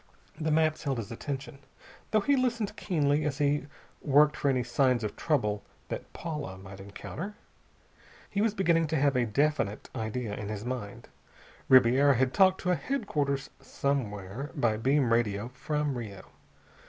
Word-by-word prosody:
The 160 0 0
maps 155 0 +2
held 140 -4 -1
his 115 -2 -5
attention, 135 +3 -5 0.5
though 215 - +3
he 280 +7 +3
listened 235 -5 0
keenly 150 -5 +1
as 145 -2 -1
he 145 0 +1 0.3
worked 150 +1 +5
for 140 - 0
any 130 -2 +2
signs 120 0 +2
of 105 - -3
trouble 105 -10 0 0.3
that - - -5
Paula 150 - -5
might 95 0 -11
encounter. 145 - -7 0.9
He 200 - -1
was 215 -1 +1
beginning 170 -4 +3
to 160 - -1
have 140 -2 +3
a 120 -2 +2
definite 115 -3 0
idea 110 -1 -3
in 105 0 -5
his 105 +1 -5
mind. 120 -5 -5 0.6
Ribiera 130 +2 +6
had 130 +1 +1
talked 190 -1 +4
to 180 - +1
a - - +4
headquarters 150 - -2
somewhere, 120 -2 -3
by 120 -7 +2
beam 130 +1 +2
radio 110 -1 0
from 150 +2 -2
Rio. 110 -5 -6
140 Hz, 155 wpm, -29 LUFS, 115-155 Hz, 0.9 s, Ribiera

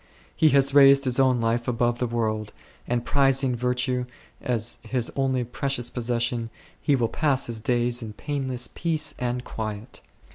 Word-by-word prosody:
He 155 - +4
has 140 -1 +3
raised 140 -1 +7
his 125 0 +1
own 130 -2 +3
life 115 +1 0
above 120 0 0
the 125 - 0
world, 110 -2 -2 0.4
and 120 0 -1
prizing 135 -2 +2
virtue 125 +1 -1 0.3
as 120 -2 -2
his 125 -3 -2
only 130 -2 0
precious 125 0 -2
possession 120 -1 -2 0.3
he 145 - +2
will 120 -3 +1
pass 140 0 +1
his 115 -2 -4
days 120 +1 0
in 110 -2 -7
painless 130 -2 -3
peace 160 -2 0
and 125 0 -2
quiet. 110 -1 -6
125 Hz, 155 wpm, -25 LUFS, 120-135 Hz, 0.4 s, raised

